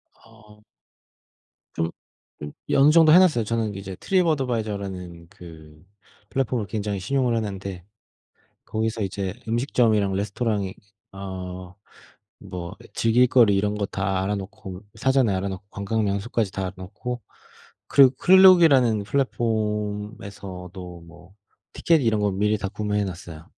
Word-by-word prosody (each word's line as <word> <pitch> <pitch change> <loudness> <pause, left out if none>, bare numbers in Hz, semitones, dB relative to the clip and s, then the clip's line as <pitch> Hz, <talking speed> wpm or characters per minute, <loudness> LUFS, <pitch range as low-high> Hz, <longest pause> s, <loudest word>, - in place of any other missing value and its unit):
어. 105 0 -20 1.1
좀 80 0 -2 0.5
좀 75 0 -7 0.2
예 - - +1
어느 140 +2 +6
정도 160 -1 +6
해 175 - +9
놨어요. 155 -12 +4
저는 110 -1 -2
이제 95 -1 -7
트립어드바이저라는 105 - -1
그 80 -2 -14 0.4
플랫폼을 125 -4 -1
굉장히 105 -1 -3
신용을 125 +3 0
하는데 100 -4 -5 0.8
거기서 110 0 -2
이제 95 -1 -3
음식점이랑 115 -4 +1
레스토랑이 100 0 -2 0.4
어 95 -2 -7 0.7
뭐 90 -1 -7 0.2
즐길 115 +2 +3
거리 115 -5 +4
이런 105 +1 0
거 105 -1 -2
다 95 -1 -2
알아 100 +2 -1
놓고 95 -1 -8
사전에 130 -6 +2
알아 95 +1 -2
놓고 95 0 -7
관광명소까지 100 +1 -1
다 95 - -4
알아 95 - -3
놓고 120 +6 -6 0.7
그리고 135 -2 +6
클룩이라는 165 - +6
플랫폼에서도 105 -6 -3
뭐 90 +3 -17 0.4
티켓 165 -2 +2
이런 110 -3 +1
거 105 -1 +1
미리 105 +3 +1
다 100 - -3
구매해 105 0 -2
놨어요. 85 -4 -8
105 Hz, 295 characters per minute, -24 LUFS, 95-115 Hz, 1.1 s, 해